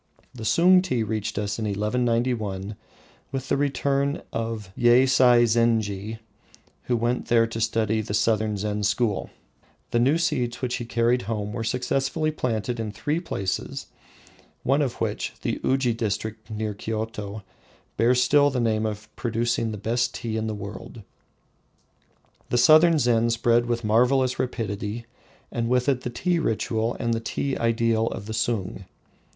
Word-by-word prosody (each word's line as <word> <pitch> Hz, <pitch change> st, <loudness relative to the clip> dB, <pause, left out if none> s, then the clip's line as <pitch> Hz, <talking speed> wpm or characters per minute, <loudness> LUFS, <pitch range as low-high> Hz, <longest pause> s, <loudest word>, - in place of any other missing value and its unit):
The 115 Hz, -3 st, -8 dB
Sung 180 Hz, -, +5 dB
tea 130 Hz, -11 st, -1 dB
reached 110 Hz, 0 st, -3 dB
us 105 Hz, +1 st, -2 dB
in 110 Hz, -, -2 dB
1191 105 Hz, -1 st, -1 dB, 0.6 s
with 135 Hz, 0 st, -4 dB
the -, -, +3 dB
return 140 Hz, 0 st, 0 dB
of 115 Hz, -4 st, -4 dB
Yeisai 125 Hz, 0 st, +5 dB
zenji, 110 Hz, -2 st, +1 dB, 0.7 s
who 120 Hz, -, +1 dB
went 120 Hz, +2 st, -1 dB
there 115 Hz, -1 st, +4 dB
to 115 Hz, 0 st, -5 dB
study 110 Hz, -1 st, +1 dB
the 105 Hz, -1 st, -3 dB
southern 110 Hz, -1 st, +1 dB
Zen 105 Hz, +1 st, -2 dB
school. 105 Hz, +1 st, 0 dB, 0.6 s
The 120 Hz, -, +2 dB
new 135 Hz, +7 st, +3 dB
seeds 125 Hz, -9 st, -1 dB
which 125 Hz, -2 st, -2 dB
he 120 Hz, -, -5 dB
carried 120 Hz, +1 st, +1 dB
home 105 Hz, -2 st, -3 dB
were 115 Hz, -1 st, -3 dB
successfully 135 Hz, +6 st, 0 dB
planted 120 Hz, -4 st, -2 dB
in 110 Hz, -2 st, -3 dB
three 145 Hz, +10 st, -2 dB
places, 100 Hz, -, -3 dB, 0.8 s
one 140 Hz, +3 st, +2 dB
of 130 Hz, -5 st, 0 dB
which, -, -, -3 dB
the -, -, -2 dB
Uji 130 Hz, -3 st, +2 dB
district 110 Hz, 0 st, -3 dB
near 110 Hz, -1 st, -3 dB
Kioto, 110 Hz, -1 st, -5 dB, 0.5 s
bears 125 Hz, +2 st, +3 dB
still 145 Hz, +3 st, +4 dB
the 130 Hz, -2 st, -2 dB
name 110 Hz, -2 st, +1 dB
of 105 Hz, -1 st, -6 dB
producing 115 Hz, -1 st, -1 dB
the 110 Hz, -, -5 dB
best 120 Hz, +4 st, -1 dB
tea 115 Hz, -2 st, -4 dB
in 110 Hz, 0 st, -1 dB
the 110 Hz, -, -3 dB
world. 105 Hz, +2 st, -8 dB, 1.5 s
The 120 Hz, -, +1 dB
southern 155 Hz, +6 st, +6 dB
Zen 120 Hz, -4 st, +2 dB
spread 115 Hz, +1 st, +2 dB
with 120 Hz, 0 st, -1 dB
marvelous 125 Hz, +4 st, +2 dB
rapidity, 110 Hz, -2 st, -3 dB, 0.5 s
and 115 Hz, -1 st, -2 dB
with 125 Hz, +1 st, +2 dB
it 135 Hz, -3 st, +2 dB
the 125 Hz, -, -4 dB
tea 175 Hz, +8 st, 0 dB
ritual 115 Hz, -3 st, -1 dB
and 115 Hz, -1 st, 0 dB
the 115 Hz, -, 0 dB
tea 135 Hz, +4 st, -2 dB
ideal 115 Hz, -1 st, +1 dB
of 100 Hz, -, -5 dB
the 110 Hz, -, -5 dB
Sung. 110 Hz, -4 st, -2 dB
115 Hz, 155 wpm, -25 LUFS, 110-125 Hz, 1.5 s, southern